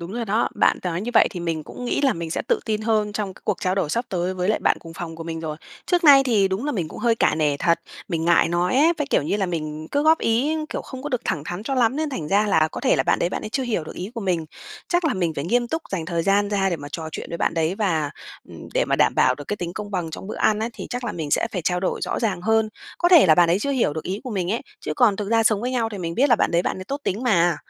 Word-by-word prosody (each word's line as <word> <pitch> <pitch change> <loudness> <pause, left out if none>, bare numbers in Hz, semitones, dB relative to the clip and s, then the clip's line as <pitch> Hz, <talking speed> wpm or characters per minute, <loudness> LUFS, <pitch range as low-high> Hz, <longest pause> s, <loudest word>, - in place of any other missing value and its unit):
đúng 170 +3 -7
rồi 235 0 -3
đó, 215 +3 +1
bạn - - +3
nói 175 -1 -2
như 235 +5 -3
vậy - - +6
thì 180 -4 -6
mình 165 -2 -3
cũng 250 - -8
nghĩ 245 - 0
là 275 -3 +3
mình 165 -1 -5
sẽ - - -2
tự - - +2
tin 215 -1 -1
hơn 215 -2 0
trong 200 -3 -3
c - - -20
cuộc - - -1
trao 185 0 0
đổi 175 -6 -1
sắp 235 +7 0
tới 180 0 -2
với 180 +1 -2
lại 215 - +2
bạn - - +2
cùng 165 -1 -11
phòng 170 -3 -6
của 165 - -7
mình 165 -1 -5
rồi, 155 -2 -4 0.3
trước 355 -2 +1
nay 275 -2 +9
thì 210 -6 +3
đúng 190 +8 -2
là 295 - -1
mình 175 -8 -2
cũng - - -10
hơi 235 -2 +2
cả - - +2
nể 150 -2 +1
thật, 170 +2 +2 0.3
mình 165 -2 -2
ngại 170 -1 +4
nói 175 +5 0
ấy, 320 +5 +5
với, 295 - -1
kiểu - - +3
như 180 +7 -1
là, 195 -2 0
mình 155 -2 -4
cứ 285 - +1
góp 320 +1 +5
ý, 265 +8 +1
kiểu, - - -3
không 260 -1 -9
có 295 - -3
được 250 -4 -1
thẳng 145 - -1
thắn 175 +4 -5
cho 270 +4 -2
lắm 250 +1 +2
nên 310 -1 -1
thành 155 - -4
ra 205 +2 +3
là 160 -5 +3
có - - -5
thể - - +3
là - - +2
bạn - - +2
đấy 170 - +1
bạn - - -4
ấy - - -5
chưa 265 +4 -2
hiểu 220 -10 -1
được - - -9
ý 185 +5 -5
của 230 - -4
mình. 175 -5 -1 0.4
Chắc 350 -1 +1
là 290 - +1
mình 175 -4 0
phải 140 - -3
nghiêm 240 +5 +1
túc 320 +3 -2
dành 170 -4 -2
thời 170 -2 -1
gian 200 +2 +2
ra 195 -2 +1
để 170 - -1
mà 145 -1 -8
trò 160 -1 -4
chuyện - - -5
với 170 - -4
bạn - - 0
đấy 165 +2 0
và, 165 -9 0 0.4
ừm, - - -11
để - - +3
mà - - 0
đảm - - +3
bảo 130 - +4
được 145 +1 -9
cái 210 - -1
tính 175 -2 -5
công 210 0 -6
bằng 175 -4 -2
trong 190 - -8
bữa 215 - -6
ăn 215 -1 +2
á 225 - -1
thì - - -8
chắc 245 0 -4
là 210 - -2
mình 155 -4 -5
sẽ - - +2
phải 180 - -3
trao 180 +1 0
đổi 190 - -1
rõ - - -2
ràng 200 -6 -1
hơn, 220 0 +2 0.3
có 350 - +3
thể 340 - +7
là 155 - +6
bạn 170 0 +4
ấy 180 - +3
chưa 280 +6 -2
hiểu 245 - +1
được 160 - -4
ý 195 +3 -3
của 255 - -5
mình 185 -4 -2
ấy, 235 - -1 0.2
chứ 155 - -3
còn 215 -5 +4
thực 205 -1 -4
ra 225 0 +3
sống 215 -2 +2
với 250 +2 -2
nhau 235 -3 0
thì 200 - -5
mình 170 -1 -4
biết 275 +6 +3
là 240 - +5
bạn - - +1
đấy 170 +1 +2
bạn - - -2
ấy 185 - -7
tốt 280 +6 -4
tính 210 +7 -1
mà. 175 - +3
195 Hz, 330 wpm, -23 LUFS, 170-235 Hz, 0.4 s, nay